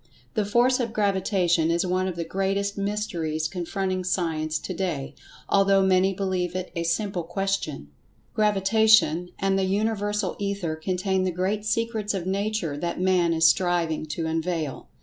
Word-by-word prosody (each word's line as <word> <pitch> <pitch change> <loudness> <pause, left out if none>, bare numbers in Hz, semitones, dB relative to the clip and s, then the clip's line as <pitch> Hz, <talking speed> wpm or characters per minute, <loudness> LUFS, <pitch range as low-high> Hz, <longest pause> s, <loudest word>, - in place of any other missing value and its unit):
The 215 -4 0
Force 245 +5 +3
of 235 -3 -2
Gravita[Pg 200 -2 +1
120]tion 165 -2 +3
is 170 +2 +1
one 185 +1 0
of 185 - -3
the 170 - -3
greatest 195 +3 -1
mysteries 185 -7 -2
confronting 185 +2 -3
Science 160 -4 -1
to 185 - -5
day, 165 -7 -3 0.3
although 195 -1 +4
many 190 0 +3
believe 185 -2 -2
it 185 0 -4
a 170 - -1
simple 180 +2 -1
question. 175 - -3 0.4
Gravitation 210 -4 +3
and 195 0 +1
the 190 - +1
Universal 205 0 -1
Ether 200 -5 -2
contain 185 +3 -1
the 185 - +1
great 190 +4 -2
secrets 220 -2 -1
of 180 -3 -3
Nature 195 -5 -1
that 170 +3 -3
Man 180 -2 +3
is 165 0 +2
striving 165 -2 +2
to 160 +2 -3
unveil. 160 -2 -3
185 Hz, 155 wpm, -25 LUFS, 170-200 Hz, 0.4 s, although